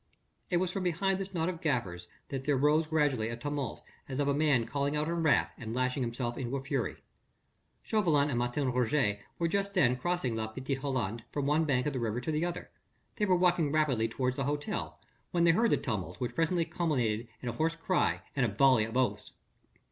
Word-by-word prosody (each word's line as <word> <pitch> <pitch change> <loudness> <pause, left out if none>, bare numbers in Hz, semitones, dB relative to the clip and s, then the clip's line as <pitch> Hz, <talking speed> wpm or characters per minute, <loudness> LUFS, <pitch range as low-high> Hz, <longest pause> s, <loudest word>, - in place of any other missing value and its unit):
It 175 - +2
was 180 0 0
from 195 - -3
behind 185 +2 0
this 195 0 -4
knot 165 -2 -1
of 180 -3 -3
gaffers 95 - -1 0.2
that 135 -1 -4
there 145 -2 +3
rose 150 +3 +3
gradually 145 -8 +1
a 115 - -4
tumult 145 -1 -4 0.3
as 130 +1 -3
of 145 - +1
a 140 - +3
man 140 -5 +3
calling 140 +4 -1
out 150 +1 0
in 170 0 -1
wrath 160 -3 +3
and 115 -1 -5
lashing 130 +1 0
himself 120 0 -2
into 130 0 -2
a 135 - -6
fury. 135 -3 -1 0.9
Chauvelin 155 -9 +2
and 120 - 0
Martin 125 +2 0
Roget 125 -4 +1 0.2
were 170 - +1
just 200 +3 -1
then 125 -9 +4
crossing 130 -3 -1
La 110 -1 -2
Petite 130 +4 -4
Hollande 120 -5 -2
from 145 -2 -2
one 150 +3 +2
bank 130 -4 +1
of 150 - -1
the 130 - -2
river 115 0 -1
to 125 +6 -3
the 155 +1 0
other: 175 0 -4 0.5
they 210 - +1
were 185 - +4
walking 175 -4 +3
rapidly 140 -7 +2
towards 125 +2 -1
the 135 - -1
hotel, 145 +1 -3 0.3
when 170 -1 +1
they 170 - +6
heard 225 +7 +3
the - - +3
tumult 110 -9 -4
which 125 -2 -2
presently 165 +1 +1
culminated 130 -10 0 0.2
in 125 - -2
a - - -3
hoarse 160 +6 0
cry 175 +2 0
and 135 - +2
a 120 - +2
volley 130 -3 +5
of 115 +3 -4
oaths. 130 -1 0
140 Hz, 215 wpm, -31 LUFS, 125-165 Hz, 0.9 s, they